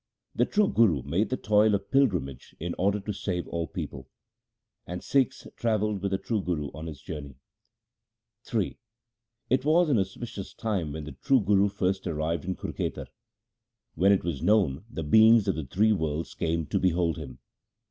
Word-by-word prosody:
The - - +2
true 210 -1 +3
Guru 90 - +3
made 85 +10 0
the 130 - -1
toil 105 0 +3
of 100 0 -5
pilgrimage 90 - 0
in 85 +1 -3
order 100 +3 +2
to 105 +1 -4
save 90 -2 -3
all 85 -1 -3
people; 65 -1 -7 0.8
And 90 0 -5
Sikhs 135 -3 +1
travelled 105 -3 0
with 100 - -1
the 95 - 0
true 110 +1 -2
Guru 75 -6 -2
on 80 +3 -7
his 75 -2 -9
journey. 75 -6 -7 1.2
Ill - - +2 0.9
It 130 0 +3
was 160 +3 +4
an 120 - +4
auspicious 95 +1 -5
time 95 -10 -2
when 80 0 -5
the 75 - -7
true 135 -2 +2
Guru 100 0 +3
first 95 -1 -1
arrived 80 +2 -2
in 95 0 -2
Kurkhetar. - - -4 0.8
When 95 +3 +4
it 100 - +3
was 85 -6 -3
known, 90 -5 +2
the 80 - -5
beings 110 +6 +6
of 95 - +3
the 80 -4 -5
three 105 +11 +2
worlds 80 -3 -2
came 80 -1 -1
to - - -1
behold 85 -2 +1
him. 70 -6 -8
95 Hz, 175 wpm, -27 LUFS, 80-105 Hz, 1.2 s, beings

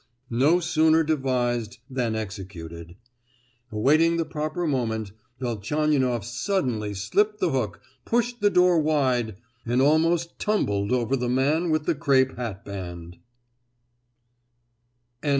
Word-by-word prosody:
No 145 +9 +4
sooner 160 -1 +3
devised 125 -6 -1
than 125 -4 -2
executed. 90 -5 -7 0.8
Awaiting 155 +10 +3
the 165 - 0
proper 155 +3 -3
moment, 110 -8 -1 0.3
Velchaninoff 125 0 0
suddenly 120 - -2
slipped 205 - 0
the 180 -4 +1
hook, 110 -9 -2 0.2
pushed 240 0 -1
the 205 - +5
door 180 -3 +4
wide, 130 -8 +1 0.3
and 120 +2 0
almost 165 +4 +2
tumbled 105 - 0
over 125 +1 +1
the 125 -2 -2
man 145 +7 +1
with 155 -1 +1
the - - +2
crape 135 -4 +2
hatband! 95 -6 -7
130 Hz, 110 wpm, -25 LUFS, 110-160 Hz, 0.8 s, the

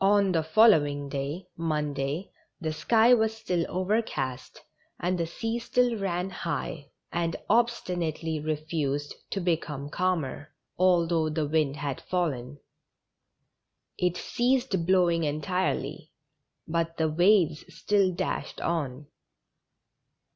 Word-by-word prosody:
On 200 -1 +4
the 165 -3 +2
following 155 -6 +4
day, 140 +6 -4
Monday, 150 0 -2 0.3
the 160 -3 -2
sky 225 +8 +4
was 220 -2 +2
still 180 -6 -1
over 190 +5 +1
cast, 130 - -5 0.4
and 180 +1 0
the 170 -2 -1
sea 225 +7 -3
still 245 0 +2
ran 190 -2 -2
high, 160 -4 -4 0.2
and 170 -1 -1 0.2
obstinately 175 -9 0
refused 150 -2 -2 0.2
to 195 - -2
become 155 -5 -2
calmer, 160 -5 -2 0.2
although 170 -3 +3
the 155 0 -1
wind 150 -2 +1
had 140 -2 -4
fallen. 145 -8 -2 1.4
It 180 0 0
ceased 240 -8 0
blowing 175 -3 +3
entirely, 155 +5 -2 0.6
but 165 0 -1
the 160 - +2
waves 175 -1 +3
still 200 -2 +2
dashed 175 - -3
on. 150 -5 -2
170 Hz, 110 wpm, -28 LUFS, 150-190 Hz, 1.4 s, On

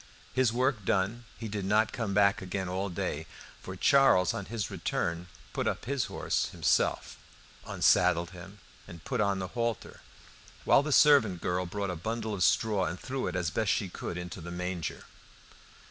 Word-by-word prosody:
His 130 -3 +3
work 125 -2 0
done, 105 +6 0
he 115 - -6
did 100 -2 -4
not 105 +3 +2
come 115 -4 -2
back 100 -1 +4
again 95 0 -3
all 95 +2 -2
day, 80 -2 -3 0.3
for 95 - -7
Charles 95 -6 +4
on 100 - -4
his 110 -1 -4
return 85 +1 -2 0.3
put - - -1
up - - -2
his 135 -1 -1
horse - - -1
himself, - - 0 0.5
unsaddled 85 +2 +3
him 95 +3 -11 0.3
and 85 -2 -12
put 125 -4 -1
on 100 -1 +1
the 95 -1 -4
halter, 115 -3 -3 0.6
while - - +6
the 150 +1 -3
servant 135 -12 +5
girl 90 +1 -1
brought 100 +1 -3
a - - -4
bundle 110 +5 -3
of 100 - -4
straw 105 +2 +2
and 90 - -4
threw 130 0 -3
it - - -4
as 85 -3 -1
best 110 0 0
she 100 - 0
could 90 - -6
into 90 0 -7
the 85 - -7
manger. 90 -1 -4
100 Hz, 175 wpm, -29 LUFS, 90-115 Hz, 0.6 s, while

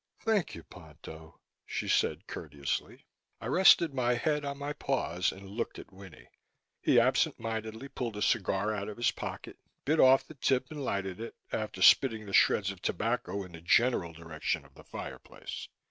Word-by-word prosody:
"Thank 220 -5 0
you, 85 - -10
Ponto," 80 -1 -13 0.2
she - - -4
said - - +1
courteously. 70 -2 -5 0.3
I - - -9
rested 175 -4 +5
my 125 -2 +1
head 150 +4 0
on 140 0 -4
my 145 +1 -4
paws 90 - -1
and 95 +1 -11
looked 105 +5 -4
at - - -11
Winnie. 95 -2 -13 0.5
He - - +5
absent - - +2
mindedly 110 +2 -4
pulled 120 -5 -5
a 105 - -1
cigar 105 -1 +1
out 100 -1 -4
of 105 - -8
his 120 - +2
pocket, - - -7 0.3
bit 155 +3 +2
off 130 +1 +6
the - - -12
tip 130 -1 0
and 150 -2 -5
lighted 95 -5 -2
it, 115 - -7 0.2
after 105 -4 -2
spitting 115 -5 +5
the 100 - -8
shreds 95 0 +4
of 95 -2 -12
tobacco 110 -1 -1
in 90 - -12
the 80 -1 -11
general 95 -1 +3
direction 80 -1 -4
of - - -20
the - - -15
fireplace. - - -8
110 Hz, 175 wpm, -30 LUFS, 95-130 Hz, 0.5 s, off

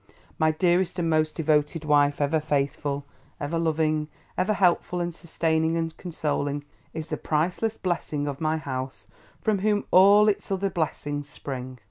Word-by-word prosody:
My 160 - +4
dearest 175 +3 +1
and 165 -2 0
most 155 0 +1
devoted 155 0 +1
wife, 145 -1 +3
ever 150 +2 +2
faithful, 145 -1 -1 0.3
ever 165 +4 -2
loving, 155 -2 +1 0.3
ever 190 +4 +1
helpful 180 -2 +2
and 175 0 -2
sustaining 160 -1 0
and 165 -1 -2
consoling, 145 -4 -2 0.3
is 160 0 -6
the - - -2
priceless 180 +8 -1
blessing 155 -5 -2
of 140 0 -4
my 155 0 +1
house; 130 -3 -5 0.4
from 215 -3 +2
whom 205 +1 +1
all 200 +3 +7
its 200 -1 0
other 195 0 0
blessings 145 -3 -3
spring. 130 -3 -6
160 Hz, 150 wpm, -26 LUFS, 145-175 Hz, 0.4 s, all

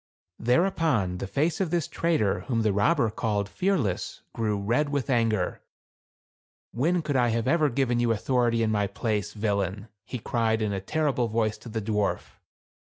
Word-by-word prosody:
Thereupon 125 - +1
the 95 - -4
face 150 - 0
of 185 - 0
this 170 -1 0
trader 160 -12 +1
whom 115 -4 +1
the 105 -2 +2
robber 115 - +2
called 105 -2 -1
Fearless 145 - -1
grew 110 -2 -1
red 120 +9 +1
with 140 -1 -1
anger. 115 -6 +1 1.1
"When 165 +8 +1
could 145 -2 -2
I 125 -2 +4
have 115 +1 0
ever 155 0 +3
given 125 -1 +1
you 120 -1 +2
authority 115 0 +1
in 110 - +1
my 105 -2 +1
place, 105 0 -2
villain? 100 -1 -2
" 100 - -62
he 125 - -5
cried 110 -1 0
in 105 -1 -1
a 95 - -3
terrible 140 +1 0
voice 110 -1 0
to 120 - -10
the 110 -1 -3
dwarf. 105 -1 -2
115 Hz, 175 wpm, -27 LUFS, 105-140 Hz, 1.1 s, I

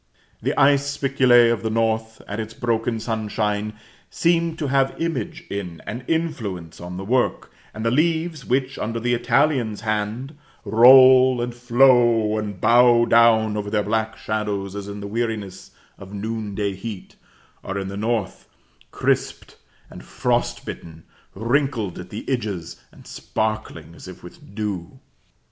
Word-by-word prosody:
The - - -1
ice 140 0 +3
spiculæ 125 -4 +4
of 110 - -4
the 110 - -2
North, 110 0 -1
and 105 +2 -4
its 110 +1 -8
broken 115 -2 -1
sunshine, 105 -1 -2 0.4
seem 170 -1 +1
to 155 - -3
have 135 -1 0
image 165 0 -3
in, 90 -5 -6
and 120 +4 -6
influence 110 - -3
on 90 +1 -7
the 95 - -6
work; 125 +3 0 0.2
and 110 +1 -6
the 115 - +2
leaves 160 +1 0
which, 130 +2 -1
under 115 +2 -3
the 120 +1 0
Italian's 120 -3 +1
hand, 110 +6 -3 0.3
roll, 130 +3 +7
and 120 0 -3
flow, 120 -3 +3
and 105 -3 -5
bow 120 +1 +5
down 115 -2 +4
over 105 -1 -3
their 105 0 0
black 110 +1 -2
shadows, 100 -2 -3
as 100 -1 -6
in 100 0 -7
the - - -6
weariness 105 -4 -4 0.3
of 95 +1 -10
noon 110 0 -4
day 100 -1 -1
heat, 95 0 -8 0.5
are, 100 - -4
in 95 -1 -3
the 100 - -6
North, 110 -1 -3 0.4
crisped - - -2 0.4
and - - -11
frost - - -1
bitten, 80 -1 -9 0.3
wrinkled 115 - -1
on 90 - -8
the 105 - -8
edges, 100 -10 -4
and - - -18
sparkling 110 -7 -4
as 85 - -13
if 95 -1 -11
with 90 +3 -14
dew. 100 -6 -5
110 Hz, 150 wpm, -22 LUFS, 105-125 Hz, 0.5 s, roll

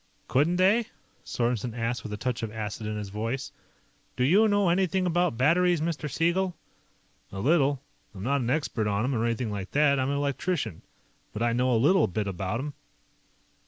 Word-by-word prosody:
"Couldn't 150 +7 +2
they?" 205 +5 +3 0.4
Sorensen 120 -1 -2
asked 115 +1 -1
with 110 - -8
a 105 - -4
touch 125 +1 -2
of 115 -2 -4
acid 110 0 -5
in 105 0 -3
his 105 -2 -5
voice. 115 +6 -3 0.7
"Do 125 - +1
you 195 +11 +5
know 205 -3 +2
anything 185 +1 +1
about 175 -6 +1
batteries, 175 +6 +3
Mr. 155 -1 -2
Siegel?" 175 +5 0 0.8
"A 95 - -6
little. 140 - +2 0.3
I'm 95 - -7
not 140 +3 +1
an 120 - -2
expert 125 -6 0
on 100 +1 0
'em, 130 +2 0
or 115 -2 0
anything 115 -1 -1
like 95 -2 -5
that. 145 -1 +4
I'm 130 +1 0
an 140 - 0
electrician. 140 - -2 0.5
But 110 - -2
I 120 -1 +2
know 125 +2 +1
a 120 - +3
little 170 +11 +4
bit 105 +3 -2
about 95 +3 -3
'em." 145 +2 -5
130 Hz, 190 wpm, -27 LUFS, 110-170 Hz, 0.8 s, you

